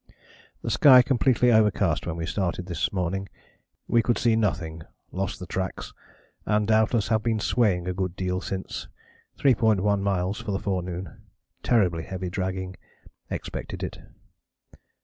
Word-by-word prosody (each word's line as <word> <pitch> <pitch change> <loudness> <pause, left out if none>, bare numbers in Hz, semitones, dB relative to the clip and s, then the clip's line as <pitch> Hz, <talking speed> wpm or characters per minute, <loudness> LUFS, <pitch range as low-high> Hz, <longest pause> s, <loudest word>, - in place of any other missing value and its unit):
"The - - -2
sky 130 -3 +8
completely 125 -1 +3
overcast 105 -8 +2
when 85 - -2
we 85 -1 -3
started 90 0 -2
this 85 -3 -2
morning. 95 +1 -2 0.6
We 120 - +4
could 120 +1 +1
see 115 -2 +3
nothing, 90 -7 -1 0.3
lost 95 +1 -3
the 90 - -6
tracks, 95 0 -4 0.5
and 105 0 +1
doubtless 110 0 +2
have 110 -1 +2
been 110 0 0
swaying 100 -6 +1
a 90 - -1
good 95 -1 -3
deal 90 0 -2
since 95 -1 -5 0.5
3.1 105 -6 +3
miles 95 0 -1
for - - -7
the - - +1
forenoon 90 -4 -4 0.4
terribly 90 -9 +2
heavy 90 +1 -5
dragging 95 0 -3 0.5
expected - - -5
it. - - -5
95 Hz, 140 wpm, -26 LUFS, 90-110 Hz, 0.6 s, sky